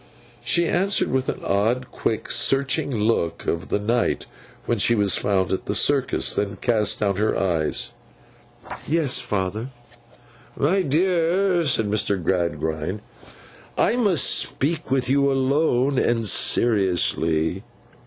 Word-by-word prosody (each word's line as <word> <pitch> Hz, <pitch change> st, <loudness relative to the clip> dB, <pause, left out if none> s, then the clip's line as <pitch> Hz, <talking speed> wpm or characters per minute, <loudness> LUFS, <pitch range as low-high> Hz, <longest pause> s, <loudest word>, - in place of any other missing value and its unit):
She 170 Hz, 0 st, +2 dB
answered 195 Hz, +4 st, +1 dB
with 130 Hz, 0 st, -1 dB
the -, -, -3 dB
old, 115 Hz, +6 st, 0 dB
quick, 110 Hz, -, -3 dB
searching 140 Hz, +2 st, +1 dB
look 110 Hz, -8 st, -1 dB
of 85 Hz, +2 st, -3 dB
the -, -, +1 dB
night 115 Hz, +3 st, -1 dB, 0.4 s
when 120 Hz, -2 st, -1 dB
she 120 Hz, +4 st, +3 dB
was 100 Hz, -3 st, +2 dB
found 95 Hz, -2 st, 0 dB
at 95 Hz, -, -3 dB
the 100 Hz, -, -1 dB
Circus; 140 Hz, +3 st, +1 dB
then 100 Hz, -1 st, -2 dB
cast 110 Hz, -1 st, 0 dB
down 100 Hz, -2 st, 0 dB
her 110 Hz, +1 st, 0 dB
eyes. 85 Hz, -5 st, -1 dB, 1.0 s
'Yes, 155 Hz, -4 st, +2 dB
father.' 105 Hz, +1 st, -3 dB, 0.9 s
'My 180 Hz, +8 st, +2 dB
dear,' 175 Hz, +2 st, +1 dB
said 120 Hz, -5 st, +2 dB
Mr. 100 Hz, -1 st, 0 dB
Gradgrind, 85 Hz, 0 st, -2 dB, 0.8 s
'I 230 Hz, -, +2 dB
must 200 Hz, -, +2 dB
speak 155 Hz, +2 st, -1 dB
with 130 Hz, -1 st, 0 dB
you 140 Hz, +1 st, +2 dB
alone 135 Hz, -1 st, +1 dB
and 115 Hz, -2 st, 0 dB
seriously. 90 Hz, -6 st, +1 dB
120 Hz, 125 wpm, -22 LUFS, 100-140 Hz, 1.0 s, she